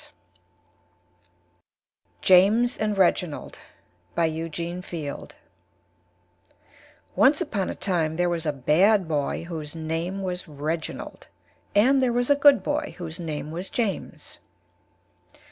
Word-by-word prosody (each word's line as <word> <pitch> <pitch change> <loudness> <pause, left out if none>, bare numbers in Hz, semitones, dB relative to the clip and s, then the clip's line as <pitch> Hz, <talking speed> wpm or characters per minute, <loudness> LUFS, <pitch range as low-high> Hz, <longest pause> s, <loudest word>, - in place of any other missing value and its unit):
] 90 - -14
JAMES 210 +7 +5
AND 210 -1 -1
REGINALD 180 -4 0 0.6
BY 170 - +2
EUGENE 165 +2 -4
FIELD 155 -6 -7 1.8
Once 265 +10 +5
upon 220 - -2
a - - -4
Time 165 -5 -1
there 175 +1 +1
was 170 -2 -2
a - - +2
Bad 175 - +3
boy 150 -1 -1
whose 160 -3 -7
Name 165 +4 -3
was 180 -1 -4
Reginald 155 +2 -5 0.5
and 260 +6 +5
there 250 -2 +2
was 245 +3 +1
a - - +6
Good 280 -7 +5
boy - - -2
whose 170 -1 -6
Name 155 -3 -5
was 175 +4 -5
James. 220 -6 -4
170 Hz, 115 wpm, -25 LUFS, 155-195 Hz, 1.8 s, a